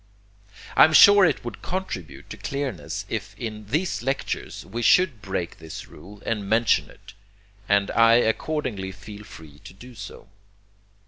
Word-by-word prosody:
I -, -, +8 dB
am 155 Hz, -, 0 dB
sure 205 Hz, +3 st, +8 dB
it 160 Hz, -, 0 dB
would 120 Hz, -, -7 dB
contribute 180 Hz, -, -5 dB
to -, -, -7 dB
clearness 130 Hz, -, -4 dB
if -, -, -5 dB
in 110 Hz, -2 st, -6 dB
these 155 Hz, -, -1 dB
lectures 135 Hz, +3 st, -4 dB
we 120 Hz, -, -5 dB
should 155 Hz, -, +3 dB
break 95 Hz, -4 st, -4 dB
this 80 Hz, -1 st, -9 dB
rule 100 Hz, +2 st, -14 dB
and 105 Hz, -3 st, -3 dB
mention 110 Hz, +1 st, +2 dB
it, 100 Hz, +1 st, -16 dB, 0.6 s
and 100 Hz, 0 st, +2 dB
I 115 Hz, 0 st, +5 dB
accordingly 115 Hz, -4 st, -1 dB
feel 105 Hz, +2 st, -11 dB
free 75 Hz, -7 st, -14 dB
to 90 Hz, -, -13 dB
do 125 Hz, +5 st, -13 dB
so. 100 Hz, -2 st, -10 dB
110 Hz, 150 wpm, -24 LUFS, 100-135 Hz, 0.6 s, I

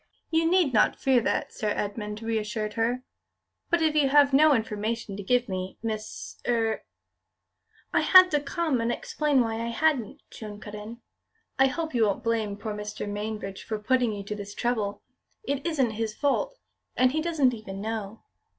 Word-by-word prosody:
"You 325 Hz, 0 st, +3 dB
need 350 Hz, -7 st, +3 dB
not 215 Hz, -, +4 dB
fear 260 Hz, -3 st, +3 dB
that," -, -, -1 dB
Sir 215 Hz, -, -2 dB
Edmund 210 Hz, +1 st, -3 dB
reassured 215 Hz, -1 st, -2 dB
her; 235 Hz, +3 st, 0 dB, 0.7 s
"but 345 Hz, -2 st, +2 dB
if 315 Hz, -1 st, +3 dB
you 295 Hz, -3 st, +3 dB
have 285 Hz, 0 st, +5 dB
no 300 Hz, +1 st, +6 dB
information 220 Hz, -1 st, -2 dB
to 205 Hz, -, -5 dB
give 245 Hz, +5 st, +1 dB
me, 185 Hz, -1 st, -4 dB
Miss 215 Hz, -1 st, -5 dB
er 225 Hz, -2 st, +1 dB, 0.5 s
" -, -, -37 dB
"I -, -, +4 dB
had 370 Hz, -1 st, +8 dB
to 295 Hz, -, +3 dB
come 290 Hz, -2 st, -1 dB
and 230 Hz, +1 st, 0 dB
explain 300 Hz, -, +1 dB
why 225 Hz, -1 st, -1 dB
I 230 Hz, -, -2 dB
hadn't," 245 Hz, -2 st, 0 dB
Joan 210 Hz, -2 st, -8 dB
cut 210 Hz, -1 st, -10 dB
in. 215 Hz, +3 st, -8 dB, 0.6 s
"I 270 Hz, -, +6 dB
hope 320 Hz, +3 st, -3 dB
you 230 Hz, -3 st, +3 dB
won't 205 Hz, +4 st, -1 dB
blame 220 Hz, -3 st, -1 dB
poor 215 Hz, 0 st, -4 dB
Mr. 210 Hz, 0 st, -5 dB
Mainbridge 205 Hz, -1 st, -4 dB
for 220 Hz, -, -3 dB
putting 245 Hz, +2 st, +1 dB
you 205 Hz, -1 st, -5 dB
to 200 Hz, -, -5 dB
this 205 Hz, 0 st, -8 dB
trouble. 215 Hz, -4 st, -1 dB, 0.4 s
It 280 Hz, -7 st, -2 dB
isn't 275 Hz, -8 st, +1 dB
his 220 Hz, 0 st, -3 dB
fault, 395 Hz, -, 0 dB, 0.4 s
and 255 Hz, 0 st, +4 dB
he 310 Hz, +3 st, 0 dB
doesn't 305 Hz, -6 st, +2 dB
even 205 Hz, -4 st, -7 dB
know." 215 Hz, 0 st, -5 dB
230 Hz, 180 wpm, -27 LUFS, 210-275 Hz, 0.7 s, had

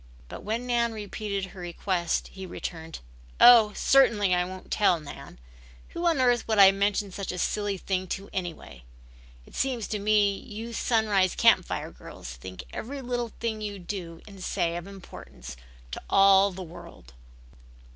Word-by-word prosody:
But -, -, -8 dB
when 225 Hz, +4 st, -3 dB
Nan 235 Hz, -2 st, +1 dB
repeated 200 Hz, -2 st, -4 dB
her 190 Hz, -, -12 dB
request 175 Hz, 0 st, -2 dB
he 190 Hz, -1 st, -9 dB
returned. 165 Hz, -2 st, -7 dB, 0.4 s
"Oh, 235 Hz, -3 st, +8 dB
certainly 215 Hz, -8 st, +4 dB
I 180 Hz, 0 st, +2 dB
won't 185 Hz, +1 st, -9 dB
tell, 190 Hz, -5 st, +3 dB
Nan. 150 Hz, -2 st, -11 dB, 0.5 s
Who 340 Hz, +1 st, -2 dB
on 330 Hz, -5 st, +2 dB
earth 245 Hz, -2 st, +2 dB
would 220 Hz, -1 st, 0 dB
I 195 Hz, -1 st, +9 dB
mention 200 Hz, 0 st, 0 dB
such 195 Hz, +1 st, -5 dB
a 180 Hz, -, -6 dB
silly 205 Hz, +2 st, -1 dB
thing 185 Hz, 0 st, -2 dB
to 195 Hz, +1 st, -12 dB
anyway? 175 Hz, -, -6 dB, 0.6 s
It -, -, -18 dB
seems 255 Hz, -5 st, -1 dB
to 210 Hz, -, -2 dB
me 205 Hz, -1 st, +2 dB
you 230 Hz, 0 st, -8 dB
Sunrise 215 Hz, -6 st, +1 dB
Camp -, -, +4 dB
Fire -, -, -4 dB
girls -, -, -10 dB
think 90 Hz, +10 st, -9 dB
every 270 Hz, +4 st, -6 dB
little 245 Hz, -1 st, -2 dB
thing 220 Hz, -2 st, -3 dB
you 205 Hz, -1 st, -4 dB
do 175 Hz, -3 st, -7 dB
and 195 Hz, -2 st, -11 dB
say 170 Hz, -1 st, -1 dB
of 175 Hz, +2 st, -6 dB
importance 185 Hz, -, -11 dB, 0.4 s
to -, -, -6 dB
all 195 Hz, 0 st, +6 dB
the 190 Hz, -1 st, -8 dB
world." 160 Hz, -, -13 dB
200 Hz, 165 wpm, -27 LUFS, 180-220 Hz, 0.6 s, I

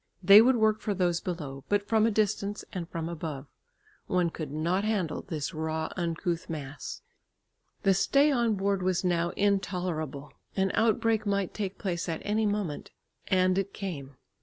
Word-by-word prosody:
They 200 Hz, +4 st, +10 dB
would 255 Hz, +3 st, +5 dB
work 215 Hz, -1 st, +2 dB
for 205 Hz, -, -1 dB
those 175 Hz, -2 st, +1 dB
below, 145 Hz, -7 st, -5 dB
but 205 Hz, 0 st, +1 dB
from 220 Hz, -1 st, +3 dB
a -, -, +1 dB
distance, 205 Hz, -1 st, 0 dB
and 175 Hz, -3 st, -4 dB
from 165 Hz, -1 st, -4 dB
above. 155 Hz, -4 st, -5 dB, 0.6 s
One 180 Hz, -2 st, +1 dB
could 155 Hz, -4 st, -6 dB
not 170 Hz, +6 st, 0 dB
handle 205 Hz, -7 st, -1 dB
this 155 Hz, -6 st, -4 dB
raw 160 Hz, 0 st, -2 dB
uncouth 170 Hz, -1 st, -2 dB
mass. 145 Hz, -3 st, -6 dB, 0.8 s
The 195 Hz, -, +5 dB
stay 280 Hz, +10 st, +4 dB
on 235 Hz, -5 st, +2 dB
board 195 Hz, 0 st, 0 dB
was 185 Hz, 0 st, 0 dB
now 175 Hz, -1 st, +1 dB
intolerable. 180 Hz, -8 st, -1 dB, 0.2 s
An 190 Hz, -1 st, +1 dB
outbreak 225 Hz, -1 st, +2 dB
might 200 Hz, -2 st, 0 dB
take 200 Hz, -2 st, -4 dB
place 175 Hz, -2 st, -3 dB
at 160 Hz, -, -3 dB
any 215 Hz, +1 st, +1 dB
moment. 205 Hz, -8 st, -2 dB, 0.4 s
And 185 Hz, -1 st, +3 dB
it 195 Hz, 0 st, -4 dB
came. 140 Hz, -9 st, -6 dB
185 Hz, 160 wpm, -29 LUFS, 165-205 Hz, 0.8 s, They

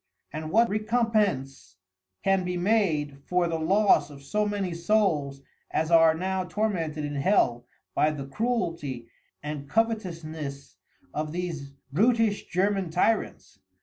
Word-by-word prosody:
And 155 Hz, +1 st, -4 dB
what 230 Hz, +7 st, +4 dB
Recompence 210 Hz, -, 0 dB, 0.5 s
can 195 Hz, -1 st, +2 dB
be 180 Hz, 0 st, -2 dB
made 175 Hz, -8 st, +1 dB
for 180 Hz, -1 st, +2 dB
the 165 Hz, -1 st, -2 dB
loss 185 Hz, -3 st, +3 dB
of 140 Hz, -1 st, -12 dB
so 210 Hz, +8 st, 0 dB
many 200 Hz, -4 st, -2 dB
Souls 170 Hz, -7 st, +1 dB, 0.3 s
as 160 Hz, +1 st, -1 dB
are 165 Hz, -1 st, +6 dB
now 185 Hz, +2 st, -1 dB
tormented 175 Hz, -5 st, -2 dB
in 145 Hz, -, -4 dB
Hell 125 Hz, -7 st, +2 dB, 0.3 s
by 150 Hz, -, +3 dB
the 145 Hz, -3 st, -5 dB
Cruelty 165 Hz, -, -2 dB, 0.3 s
and 145 Hz, -2 st, -5 dB
Covetousness 165 Hz, -11 st, -2 dB, 0.4 s
of 150 Hz, 0 st, -3 dB
these 165 Hz, -5 st, -4 dB, 0.2 s
Brutish 220 Hz, -, +2 dB
German 195 Hz, 0 st, 0 dB
Tyrants. 180 Hz, +7 st, -1 dB
170 Hz, 125 wpm, -27 LUFS, 150-205 Hz, 0.5 s, are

